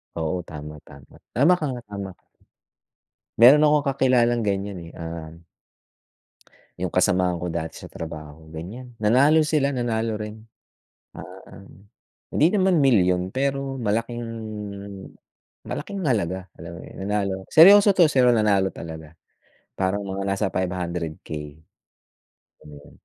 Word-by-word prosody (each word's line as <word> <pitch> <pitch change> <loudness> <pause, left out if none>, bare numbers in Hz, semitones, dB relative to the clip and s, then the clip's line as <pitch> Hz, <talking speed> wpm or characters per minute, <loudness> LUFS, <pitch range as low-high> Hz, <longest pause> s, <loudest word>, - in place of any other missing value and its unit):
Oo, 85 +2 -2
tama, 75 0 -9
tama. 70 -1 -16 0.2
Tama 145 +9 +5
ka 155 - -2
nga, 120 -1 -6
tama 100 -1 -5
ka. - - -51 1.2
Meron 130 +6 +8
akong 150 -1 +3
kakilalang 120 -3 +2
ganyan, 100 -2 -2
eh, - - -14
ah 80 -1 -6 1.5
yung 90 -1 -4
kasamahan 90 -2 +2
ko 90 - -3
dati 80 -1 -5
sa - - -10
trabaho 80 -1 -9
ganyan, 115 +10 -8
nanalo 140 +9 +4
sila, 150 -3 +1
nanalo 115 -2 -1
rin. 110 +1 -8 0.7
Ah, 95 +1 -12 0.7
hindi 160 +4 +4
naman 190 -6 +2
milyon 90 -8 +3
pero 135 +2 -2
malaking 115 +1 -2 1.4
malaking 200 -1 -5
halaga, 95 - -1
alam 85 0 -9
mo - - -10
'yun - - -12
nanalo. 100 -2 -2
Seryoso 200 +5 +8
'to, 170 -5 +5
seryo 125 -3 +4
nanalo 100 -4 +2
talaga, 80 -1 -9 0.6
parang 95 +2 0
mga 100 0 -4
nasa 100 +1 0
500K. 85 -5 -4 1.1
Ayan. 75 -1 -13
100 Hz, 120 wpm, -23 LUFS, 90-130 Hz, 1.5 s, Meron